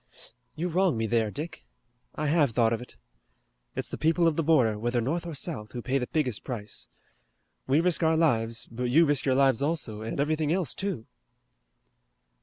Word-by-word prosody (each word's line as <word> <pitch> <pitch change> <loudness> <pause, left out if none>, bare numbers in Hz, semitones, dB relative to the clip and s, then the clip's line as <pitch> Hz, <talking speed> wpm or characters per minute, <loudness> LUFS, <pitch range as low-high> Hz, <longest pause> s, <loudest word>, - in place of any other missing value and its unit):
"You 165 +3 -2
wrong 180 -4 +2
me 110 - 0
there, 110 -1 +1
Dick. 150 +9 -6 0.5
I 155 - -2
have 150 -1 +3
thought 115 -1 +3
of 115 - -2
it. 125 - -11 0.8
It's - - -2
the - - -6
people 165 +2 +3
of 160 - +2
the 165 - +1
border, 130 -10 +3
whether 120 +2 0
North 165 +9 -2
or 165 - -5
South, 130 -9 -4
who 120 - -4
pay 135 +1 0
the 125 - -3
biggest 135 -9 -1
price. 110 -5 -4 0.8
We 140 +4 +3
risk 180 -1 +1
our 160 -1 +3
lives, 115 -8 +1
but 125 +2 -3
you 150 +8 +5
risk 145 -3 +1
your 130 - +3
lives 135 -3 +3
also, 140 -8 -1
and 110 +5 -4
everything 155 +1 +1
else, 175 -6 +1
too." 190 - -3
140 Hz, 190 wpm, -27 LUFS, 115-160 Hz, 0.8 s, you